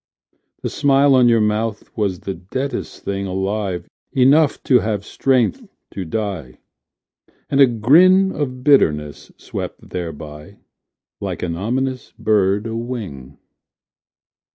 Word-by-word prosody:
The - - -1
smile 140 0 +3
on 125 -2 +5
your 115 -1 +4
mouth 105 0 -2
was 100 -5 -1
the 95 - -4
deadest 130 +11 -5
thing 100 0 -3
Alive 95 -1 -2 0.3
enough 140 +3 +4
to 125 -2 +4
have 105 -2 -2
strength 135 - 0 0.2
to 95 - -5
die; 90 - -4 0.9
And 140 0 +4
a 135 - +8
grin 175 - +5
of 130 -6 -4
bitterness 75 - +2
swept - - -7
thereby 75 -3 -7 0.6
Like - - -4
an 85 -2 -2
ominous 130 +7 -3
bird 105 -2 +1
a 115 0 -4
wing. 100 - -6
110 Hz, 120 wpm, -20 LUFS, 95-130 Hz, 0.9 s, a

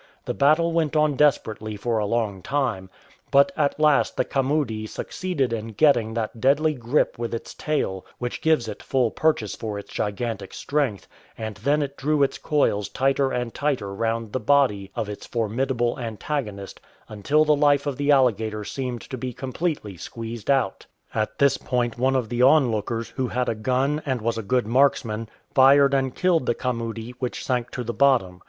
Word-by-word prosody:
The - - -2
battle 155 - +3
went 160 -2 0
on 150 -2 +3
desperately 110 -7 +1
for 115 +2 -1
a 105 - -1
long 105 -4 -1
time, 115 -8 -2 0.4
but 140 +6 +5
at 150 -1 0
last 150 -2 +3
the - - +2
camudi 135 -6 -1
succeeded 140 -3 -2
in 115 0 -4
getting 115 -2 +3
that 115 0 -3
deadly 145 +4 +3
grip 125 0 0
with 115 0 -2
its 115 - -7
tail 95 -11 -2
which 120 0 -4
gives 155 -8 +2
it 105 -1 -6
full 125 -4 +1
purchase 150 -10 0
for 110 -3 -5
its 100 - -9
gigantic 105 -1 -3
strength, 140 -9 -1 0.3
and 110 -1 -5
then 145 +1 +1
it 140 0 -7
di"ew 150 +1 +2
its 135 - -1
coils 120 -9 +1
tighter 135 0 +1
and 125 -2 -2
tighter 130 -9 -1
round 115 +1 -2
the 130 - 0
body 110 -6 +2
of 110 - -2
its 105 -1 -7
formidable 120 +2 -1
antagonist 110 -3 -4 0.3
until 140 +9 +1
the 150 0 +4
life 145 -1 +3
of 140 -3 -2
the 145 0 -1
alligator 110 -6 +2
seemed 125 +1 -4
to 130 - -7
be 125 +1 -4
completely 130 - -3
squeezed 115 +5 -7
out. 130 -8 +1 0.3
At 110 -1 -2
this 140 -1 +3
point 120 -2 -1
one 130 +1 +2
of 125 -4 0
the 120 +1 -1
onlookers, 115 -5 +3
who 130 -1 -2
had 125 0 -1
a - - +1
gun 130 +7 0
and 130 -3 -1
was 115 +1 -1
a - - -2
good 125 +3 0
marksman, 115 -3 +1 0.2
fired 140 +1 +6
and 135 -2 0
killed 170 -7 +2
the - - +2
camudi, 115 -2 -3
which 125 -2 -4
sank 125 -2 -1
to 125 - -3
the 120 0 -4
bottom. 120 -11 +2
125 Hz, 180 wpm, -24 LUFS, 110-140 Hz, 0.4 s, fired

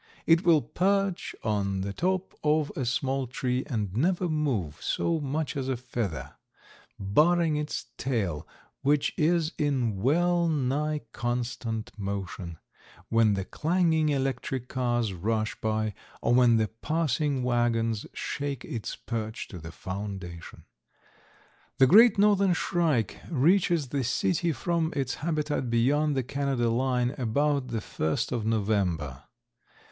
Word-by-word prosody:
It 165 +2 +5
will 165 -6 +5
perch 195 +6 0
on 100 -3 0
the 100 +1 -3
top 185 - -1
of 150 -1 +2
a 130 - -2
small 130 +2 -1
tree 125 +1 -1
and 105 -8 -2
never 175 +7 +1
move 135 - -1
so 165 -1 0
much 145 +2 -2
as 135 -1 -2
a 130 - 0
feather, 120 -8 -4 0.6
barring 155 - +3
its 150 -3 -3
tail, 95 - -1 0.3
which 145 +1 +2
is 165 0 +2
in 130 -8 0
well 170 - +3
nigh 150 +1 0
constant 120 -2 -3
motion, 95 -4 -4 0.5
when 115 -2 +4
the 95 -1 -3
clanging 160 - +1
electric 135 -2 -1
cars 120 -5 0
rush 110 +4 -1
by 110 -1 0 0.3
or 120 - +1
when 120 -2 +5
the 110 -1 +2
passing 145 +1 -1
wagons 115 -3 +1
shake 140 -3 -4
its 115 -3 -5
perch 110 -2 -5
to 90 - -8
the 80 +1 -8
foundation. 95 -3 -7 1.1
The 135 - +7
Great 215 - +7
Northern 200 -2 +4
Shrike 160 - 0
reaches 170 -1 +2
the 140 0 -1
city 170 +7 +1
from 165 +3 -1
its 135 -2 -1
habitat 150 -5 -1
beyond 140 +6 +2
the 130 - +1
Canada 135 -3 0
line 125 0 +1
about 140 +3 +1
the 115 -3 -3
first 80 -5 -2
of 115 -3 -2
November. 95 - 0
130 Hz, 130 wpm, -28 LUFS, 110-155 Hz, 1.1 s, The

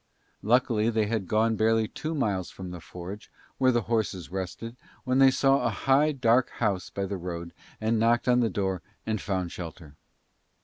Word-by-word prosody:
Luckily 115 -1 +2
they 110 -2 +1
had 105 -3 -2
gone 110 +2 +2
barely 110 0 +2
two 155 +8 -5
miles 100 - -1
from 95 -2 -8
the 90 - -7
forge 90 +5 -9 0.3
where 130 -1 +5
the 120 -2 +1
horses 105 -6 -2
rested, 95 +5 -5 0.3
when 130 0 +1
they 135 0 +8
saw 135 +1 +3
a - - +2
high, 135 +7 +3
dark 125 -3 +3
house 100 -5 -1
by 100 - -3
the 100 0 -4
road 85 -1 -6 0.3
and 110 +1 +1
knocked 115 +2 +2
on 125 0 +4
the 115 -2 +2
door 95 -4 -2 0.2
and 110 -3 -1
found 95 -3 -2
shelter. 80 -3 -8
110 Hz, 180 wpm, -27 LUFS, 95-120 Hz, 0.3 s, they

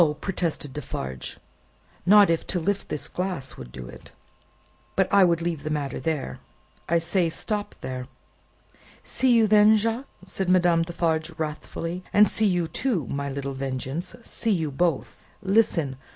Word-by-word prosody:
protested 165 -7 -2
Defarge. 65 - -5 0.7
"Not 205 -2 +7
if 165 - -1
to 180 - -1
lift 200 +4 -1
this 150 - -2
glass 180 -8 -3
would - - -10
do 65 -1 -8
it! 60 - -12 0.8
But - - +3
I 200 -1 +7
would 170 -2 +2
leave 170 -3 -2
the 155 - -4
matter 145 -2 -2
there. 155 -5 -3 0.5
I 170 - +4
say, 170 +1 +1
stop 205 +5 -3
there." 130 -1 -5 1.0
"See 260 -1 +2
you 230 -2 +5
then, 215 +1 +6
Jacques," 230 +5 -1 0.2
said 190 0 -3
Madame 175 -2 +4
Defarge, 165 -1 -1
wrathfully; 165 +3 -4
"and 210 +1 +6
see 220 - +3
you, 175 -3 +1
too, 195 - -1
my 140 0 -2
little 140 0 -4
Vengeance; 135 +5 -4
see 230 - -1
you 165 -8 +1
both! 165 +2 -1 0.2
Listen! 190 - +2
170 Hz, 150 wpm, -25 LUFS, 145-195 Hz, 1.0 s, Not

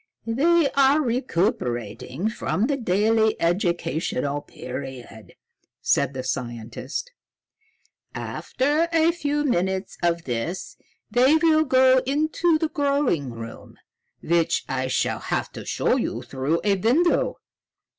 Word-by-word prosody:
"They 300 +7 +3
are 275 +2 +4
recuperating 170 - -1
from 220 -1 -1
the 280 +2 0
daily 220 -1 +2
educational 165 -5 -1
period," 125 -6 -9 0.4
said 140 -1 +1
the 130 - -3
scientist. 125 - -5 1.0
"After 295 +6 -1
a 330 0 +4
few 295 -3 -1
minutes 190 -5 -1
of 170 -1 +1
this 125 +9 -4 0.4
they 255 +6 +5
will 315 -1 +4
go 260 -1 +5
into 310 +4 +2
the 315 0 -1
growing 280 - 0
room, 115 -1 -9 0.5
which 170 0 +1
I 130 0 -2
shall 130 - 0
have - - -2
to - - -9
show - - +1
you - - -3
through 135 +5 -1
a 200 -1 +3
window. 265 - +2
205 Hz, 115 wpm, -24 LUFS, -, 1.0 s, they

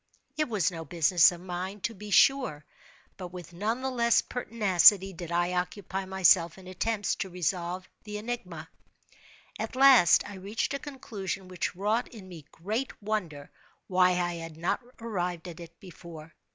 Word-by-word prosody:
It 305 -3 -1
was 200 -6 +1
no 165 -2 -6
business 165 +2 +4
of 175 -1 -9
mine, 185 +2 -5
to 230 - -2
be 210 0 -10
sure, 230 - +3 0.5
but 185 - -6
with 175 -1 -10
none 220 +8 -2
the 265 - -1
less 235 -2 +3
pertinacity 200 -5 +4
did 170 -1 -8
I 175 +1 0
occupy 190 +1 -3
myself 185 -2 +3
in 190 - -14
attempts 205 +3 -1
to 190 - -4
resolve 180 +1 -3 0.2
the 210 -1 -6
enigma. 190 -8 -6 0.9
At - - -4
last 260 -9 +6
I 205 -1 -9
reached 200 +7 -3
a 280 - -2
conclusion 205 -10 -6
which 180 -1 -3
wrought 210 +6 0
in 210 -5 -12
me 165 -5 -11
great 215 +10 -4
wonder 185 -9 -4 0.3
why 180 -1 +3
I 175 0 -1
had 165 -1 -8
not 170 +8 -1 0.2
arrived 180 -6 -3
at 170 -1 -9
it 170 0 -12
before. 165 -4 -12
185 Hz, 165 wpm, -28 LUFS, 175-215 Hz, 0.9 s, last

